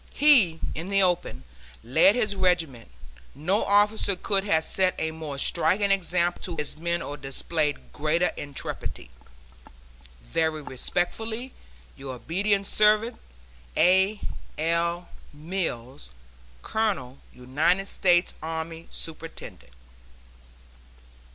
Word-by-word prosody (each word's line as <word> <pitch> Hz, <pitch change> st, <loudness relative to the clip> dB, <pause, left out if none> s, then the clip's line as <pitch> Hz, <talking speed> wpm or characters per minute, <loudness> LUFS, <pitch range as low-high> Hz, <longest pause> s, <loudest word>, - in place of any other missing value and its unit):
He, 235 Hz, -, +5 dB
in 170 Hz, +4 st, -5 dB
the 195 Hz, -1 st, +5 dB
open, 175 Hz, -, 0 dB, 0.4 s
led 160 Hz, -, +5 dB
his 215 Hz, -5 st, 0 dB
regiment; 170 Hz, -, 0 dB, 0.5 s
no 180 Hz, +9 st, +1 dB
officer 205 Hz, 0 st, +3 dB
could 195 Hz, +1 st, 0 dB
have 160 Hz, -5 st, +3 dB
set 185 Hz, +2 st, 0 dB
a 160 Hz, 0 st, -1 dB
more 155 Hz, -3 st, -6 dB
striking 175 Hz, +7 st, +2 dB
example 175 Hz, -2 st, +1 dB
to 175 Hz, -, -5 dB
his 150 Hz, -2 st, -2 dB
men 170 Hz, +2 st, -1 dB
or 145 Hz, -, -6 dB
displayed 145 Hz, +2 st, -2 dB
greater 160 Hz, +3 st, +1 dB
intrepidity. 140 Hz, -, -6 dB, 1.1 s
Very 155 Hz, -, -1 dB
respectfully, 220 Hz, -, -3 dB, 0.4 s
Your 135 Hz, -1 st, -7 dB
obedient 195 Hz, -, 0 dB
servant, 215 Hz, +3 st, +3 dB, 0.6 s
A. 190 Hz, +4 st, +4 dB, 0.4 s
L. 170 Hz, +2 st, 0 dB, 0.3 s
MILLS, 145 Hz, -, -4 dB, 0.5 s
Colonel 185 Hz, -, -2 dB
United 150 Hz, +10 st, 0 dB
States 175 Hz, -2 st, +3 dB
Army, 160 Hz, +1 st, -5 dB
Superintendent. 160 Hz, -, -6 dB
170 Hz, 100 wpm, -26 LUFS, 155-195 Hz, 1.1 s, He